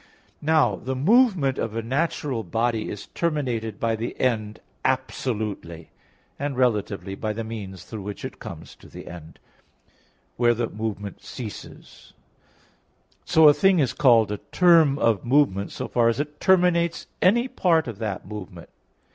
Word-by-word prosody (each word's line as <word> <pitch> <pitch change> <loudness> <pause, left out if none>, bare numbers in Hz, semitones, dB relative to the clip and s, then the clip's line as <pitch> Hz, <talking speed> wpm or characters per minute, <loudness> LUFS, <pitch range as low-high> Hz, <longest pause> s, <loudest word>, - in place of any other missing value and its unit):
Now 155 +1 +3
the 130 +1 -4
movement 180 - +3
of 115 -1 -3
a 115 - -2
natural 135 -1 -1
body 115 0 -1
is 105 - -7
terminated 125 - -2
by 115 -1 0
the 115 +2 -5
end 110 -4 -1 0.2
absolutely; 110 -10 -3 0.5
and 140 -2 -3
relatively 105 -5 0
by 105 +2 -3
the 115 +2 -4
means 105 -4 -7
through 110 -2 -8
which 100 +1 -7
it - - -8
comes - - -9
to - - -16
the - - -10
end, 80 -2 -11 1.0
where 120 -1 +3
the 115 0 -1
movement 105 -2 -5
ceases; 115 -5 -10 1.1
so 160 -1 +6
a 145 - +8
thing 195 +3 +3
is 135 -7 +1
called 115 -6 +4
a 105 - -2
term 165 -6 +5
of 115 -7 +1
movement, 120 -7 +2
so - - -5
far 120 -1 +2
as 115 - -1
it 150 0 -4
terminates 175 -3 +2 0.2
any 235 +7 +4
part 165 - +1
of 110 -4 -7
that 105 -4 -4
movement. 95 -5 -9
120 Hz, 150 wpm, -24 LUFS, 105-150 Hz, 1.1 s, a